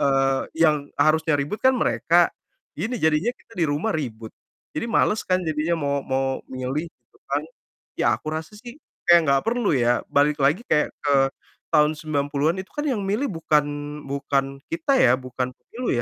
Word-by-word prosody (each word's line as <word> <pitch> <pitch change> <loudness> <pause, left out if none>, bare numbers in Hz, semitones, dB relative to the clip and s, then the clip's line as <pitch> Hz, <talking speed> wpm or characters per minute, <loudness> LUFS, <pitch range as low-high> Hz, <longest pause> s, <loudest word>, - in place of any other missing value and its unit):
eee, 135 -1 +2 0.2
yang 155 -1 +5 0.2
harusnya 160 0 +3
ribut 150 +10 -4
kan 260 0 +5
mereka, 175 -7 +3 0.5
gini 220 +10 -3
jadinya 160 +8 +2
kita - - -23
di 165 - +4
rumah 150 +10 0
ribut. 115 -7 -5 0.4
Jadi - - -2
males 215 -1 +2
kan, 185 0 +3
jadinya 155 +2 0
mau 140 -2 0
mau 135 0 -1 0.2
milih 130 +5 -3
gitu - - -32
kan. - - +1 0.6
Ya, - - +2
aku 155 - -6
rasa 160 +3 -5
sih 240 +2 -10 0.3
kayak 175 0 +8
nggak 135 0 +3
perlu 235 -1 +1
ya, 120 -1 +2
balik 145 +1 +2
lagi 145 +11 +3
kayak 150 - +2
ke 145 - +2 0.6
tahun 150 -1 +5
90-an 145 +1 0
itu 190 - -11
kan 295 - -3
yang 245 -6 0
milih 215 +9 0
bukan 160 -4 +2 0.5
bukan 140 -1 -1
kita 330 -4 0
ya, 120 - +6
bukan 125 0 -3
pemilu 245 +1 -7
155 Hz, 170 wpm, -23 LUFS, 140-190 Hz, 0.6 s, kayak